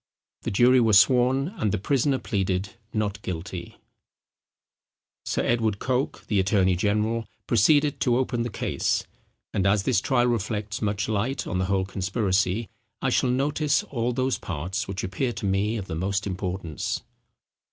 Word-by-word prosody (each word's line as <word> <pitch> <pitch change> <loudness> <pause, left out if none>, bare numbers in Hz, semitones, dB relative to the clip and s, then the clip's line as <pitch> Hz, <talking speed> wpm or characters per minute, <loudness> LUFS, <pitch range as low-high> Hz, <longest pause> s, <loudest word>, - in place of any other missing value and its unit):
The - - -3
jury 125 +5 +5
were 115 -3 +3
sworn, 130 - +5
and 105 - 0
the - - 0
prisoner 135 +7 +1
pleaded 95 -4 -1 0.2
not 105 -1 -2
guilty. 90 0 -6 1.5
Sir - - 0
Edward 110 -3 +1
Coke, 130 +4 -2
the 105 -2 +1
attorney 95 -1 +3
general, 105 +4 0 0.2
proceeded 145 +6 +3
to 125 -3 +2
open 125 -2 0
the 120 - -1
case: - - -1 0.5
and 100 0 +1
as 100 0 +3
this 95 - +2
trial 125 -2 +2
reflects 110 -2 -2
much 105 -1 -1
light 110 +5 -1
on 90 - -2
the 95 - +1
whole 95 0 +1
conspiracy, 100 +1 0 0.3
I - - 0
shall 130 - +2
notice 145 +3 +1
all 120 -2 -2
those 130 +1 0
parts 95 +7 -3
which 95 0 -4
appear 120 +7 -1
to - - -5
me 100 +3 +1
of 100 - -5
the 90 - -6
most 95 +5 -1
importance. 90 -4 -3
105 Hz, 155 wpm, -25 LUFS, 95-125 Hz, 1.5 s, jury